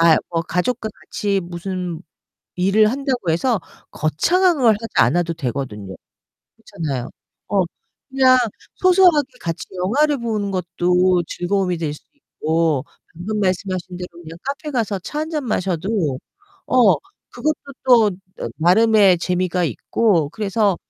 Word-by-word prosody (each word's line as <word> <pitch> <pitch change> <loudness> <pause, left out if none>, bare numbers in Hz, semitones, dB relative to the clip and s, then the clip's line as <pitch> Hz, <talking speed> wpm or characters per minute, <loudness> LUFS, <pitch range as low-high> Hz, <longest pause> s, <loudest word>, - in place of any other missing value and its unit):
아 - - +2
뭐 165 -1 0
가족과 220 +7 -1
같이 200 -1 -2
무슨 175 -1 -5 0.6
일을 200 +4 +4
한다고 260 - -1
해서 215 +8 +1 0.3
거창한 345 - +2
걸 235 -4 +5
하지 225 +2 -7
않아도 170 +8 +3
되거든요. 125 -10 -5 0.6
그렇잖아요. 135 -6 -5 0.4
어 200 -1 +2 0.5
그냥 260 -1 +5 0.4
소소하게 360 -6 +5
같이 165 -1 -4
영화를 275 +11 +1
보는 215 -4 -2
것도 180 0 +1
즐거움이 180 0 -1
될 155 -3 -2
수 - - -14
있고 160 - -1 0.3
방금 200 +6 -4
말씀하신 185 -1 -2
대로 180 0 -6
그냥 165 0 -10
카페 280 +2 -4
가서 220 -6 -1
차 295 - -5
1 315 +1 -3
잔 305 -4 -2
마셔도 185 - -1 0.5
어 240 -6 +5 0.4
그것도 310 0 -1 0.3
또 235 -5 +6 0.5
나름의 195 +2 +5
재미가 180 +1 0
있고 165 - +1
그래서 205 0 0
190 Hz, 265 characters per minute, -20 LUFS, 170-230 Hz, 0.6 s, 또